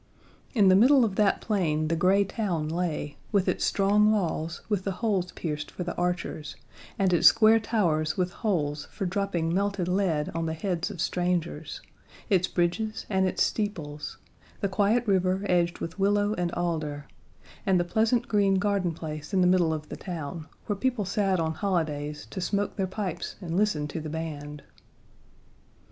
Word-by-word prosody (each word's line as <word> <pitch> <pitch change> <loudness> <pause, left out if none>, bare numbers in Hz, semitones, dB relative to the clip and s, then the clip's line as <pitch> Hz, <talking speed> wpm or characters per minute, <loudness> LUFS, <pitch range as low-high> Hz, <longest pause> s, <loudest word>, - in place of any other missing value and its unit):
In 205 -4 +5
the 185 - +7
middle 255 +5 +6
of 200 -4 -3
that 210 -2 +3
plain 160 -8 0
the 165 - +1
gray 190 +4 +4
town 190 -7 -2
lay, 160 -3 -2
with 200 -3 +2
its - - 0
strong 210 +2 +3
walls 165 -5 -1
with 205 -3 -1
the 195 - -2
holes 190 -4 -1
pierced 150 -2 -4
for 180 - -5
the 175 - -3
archers, 175 -3 -2 0.4
and 190 -2 +2
its 170 - +6
square 225 0 +6
towers 165 -9 0
with 180 -1 0
holes 155 -10 -1
for 195 - -4
dropping 180 -3 -1
melted 200 -1 0
lead 180 -5 0
on 165 0 -2
the 160 - -2
heads 180 +1 -2
of 200 -5 -8
strangers; 175 -4 -2 0.5
its 185 -2 +3
bridges 215 +6 -1
and 190 -1 +2
its - - +1
steeples; 155 -9 -3 0.4
the 200 - 0
quiet 210 +5 +2
river 190 -1 +1
edged 175 -2 +1
with 165 +4 -6
willow 205 +1 +2
and 175 -3 -1
alder; 155 -4 -2 0.6
and 190 -2 +3
the - - +2
pleasant 220 +6 +1
green 200 -2 +3
garden 195 -3 +1
place 155 +3 -6
in 185 - +4
the - - +4
middle 180 -2 +4
of 155 -1 -4
the - - -5
town, 165 -2 -6 0.2
where 205 - -1
people 240 0 -1
sat 195 -1 +1
on 160 -1 0
holidays 155 -6 -2
to 190 - -4
smoke 200 +2 -1
their 190 -2 -1
pipes 185 -3 -4
and 170 -4 -4
listen 180 -7 +1
to 160 +2 -5
the 155 - -5
band. 150 -2 -6
180 Hz, 175 wpm, -27 LUFS, 160-200 Hz, 0.6 s, the